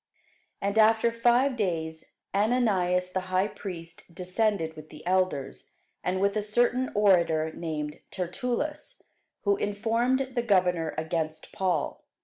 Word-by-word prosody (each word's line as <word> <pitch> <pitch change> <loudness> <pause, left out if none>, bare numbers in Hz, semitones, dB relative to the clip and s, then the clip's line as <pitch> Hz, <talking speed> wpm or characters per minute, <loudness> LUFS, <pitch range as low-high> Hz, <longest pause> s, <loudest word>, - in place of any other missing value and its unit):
And 200 +2 +1
after 225 +1 +5
five 240 +3 +3
days 160 -7 -3 0.2
Ananias 195 -5 +2
the 185 - 0
high 185 +2 +2
priest 170 -5 -8
descended 180 -1 -1
with 155 0 -11
the 150 +1 -12
elders, 185 -6 -1 0.3
and 185 +1 0
with 200 +1 +2
a 215 - +1
certain 240 +4 +1
orator 170 -6 +3
named 150 -3 -4
Tertullus, 250 - -3 0.4
who 200 -1 +3
informed 230 +6 0
the 240 - +1
governor 180 -7 +2
against 160 0 -3
Paul. 185 -2 -1
190 Hz, 125 wpm, -28 LUFS, 170-225 Hz, 0.4 s, after